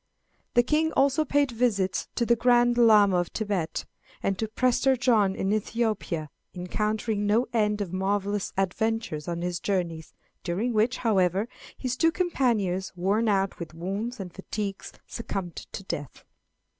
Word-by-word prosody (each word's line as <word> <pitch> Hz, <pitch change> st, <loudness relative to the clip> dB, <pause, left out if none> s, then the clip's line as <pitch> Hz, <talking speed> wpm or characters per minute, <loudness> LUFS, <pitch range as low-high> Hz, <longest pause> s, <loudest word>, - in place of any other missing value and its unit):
The 240 Hz, -, +6 dB
King 310 Hz, +5 st, +1 dB
also 280 Hz, +3 st, +3 dB
paid 285 Hz, -2 st, +1 dB
visits 220 Hz, -6 st, 0 dB
to 235 Hz, -, +1 dB
the 235 Hz, -, +4 dB
Grand 240 Hz, 0 st, +4 dB
Llama 210 Hz, -5 st, +6 dB
of 175 Hz, -1 st, +1 dB
Thibet, 200 Hz, -7 st, -2 dB, 0.4 s
and 195 Hz, -, +1 dB
to 220 Hz, -, 0 dB
Prester 255 Hz, +3 st, +2 dB
John 220 Hz, -6 st, +3 dB
in 195 Hz, +2 st, 0 dB
Ethiopia, 215 Hz, -8 st, -1 dB, 0.2 s
encountering 210 Hz, +3 st, -1 dB
no 225 Hz, +4 st, +3 dB
end 210 Hz, -2 st, +1 dB
of 185 Hz, -3 st, -4 dB
marvellous 200 Hz, +1 st, -1 dB
adventures 195 Hz, -4 st, -1 dB
on 170 Hz, 0 st, -3 dB
his 175 Hz, -1 st, -2 dB
journeys, 170 Hz, -5 st, -2 dB, 0.3 s
during 200 Hz, +8 st, -1 dB
which, 225 Hz, +4 st, +2 dB
however, 195 Hz, -2 st, +2 dB, 0.3 s
his 255 Hz, -1 st, -2 dB
two 325 Hz, +5 st, +3 dB
companions, 235 Hz, -, 0 dB
worn 200 Hz, +5 st, +1 dB
out 195 Hz, -1 st, +1 dB
with 165 Hz, -2 st, -7 dB
wounds 200 Hz, +8 st, -4 dB
and 180 Hz, -3 st, -6 dB
fatigues, 195 Hz, 0 st, -5 dB
succumbed 195 Hz, -7 st, -5 dB, 0.2 s
to -, -, -6 dB
death. 145 Hz, -7 st, -6 dB
210 Hz, 145 wpm, -27 LUFS, 190-235 Hz, 0.4 s, The